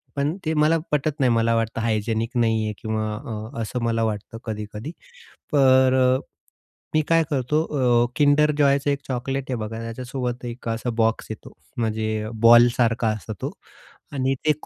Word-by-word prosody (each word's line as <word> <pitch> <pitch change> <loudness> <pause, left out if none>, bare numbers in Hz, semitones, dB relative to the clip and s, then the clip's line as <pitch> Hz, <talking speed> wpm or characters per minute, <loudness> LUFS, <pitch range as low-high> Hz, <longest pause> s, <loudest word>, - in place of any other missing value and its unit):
पण 145 +3 0
ते 160 - 0
मला 155 +1 +3
पटत 150 +1 0
नाही. 130 -3 +3
मला 115 0 +2
वाटतं 115 0 -1
हायजेनिक 110 +1 -1
नाहीये, 110 -2 +1
किंवा 110 -1 -2
अ, 110 -2 -6
असं 115 +2 -3
मला 115 -1 +1
वाटतं 110 0 -3
कधी-कधी. 105 +4 -6 0.6
तर 130 -2 +5
अ, 130 +1 +3 0.8
मी 155 - +5
काय 165 0 +4
करतो, 145 +1 +1
अ, 125 -6 +2
किंडर 150 0 +4
जॉयचं 140 -1 +3
1 140 - -1
चॉकलेट 135 +1 -2
आहे, 125 - -1
बघा. 110 0 -5
त्याच्यासोबत 125 +1 -4
1 120 0 -7
असा 115 +2 -2
बॉक्स 115 0 +1
येतो, - - -9 0.2
म्हणजे 110 -1 -1
बॉल 120 +1 +8
सारखा 115 -1 +2
असतो 110 0 -4
तो. - - -3 0.6
आणि 135 -1 0
ते 155 - +6
120 Hz, 160 wpm, -23 LUFS, 110-135 Hz, 0.8 s, बॉल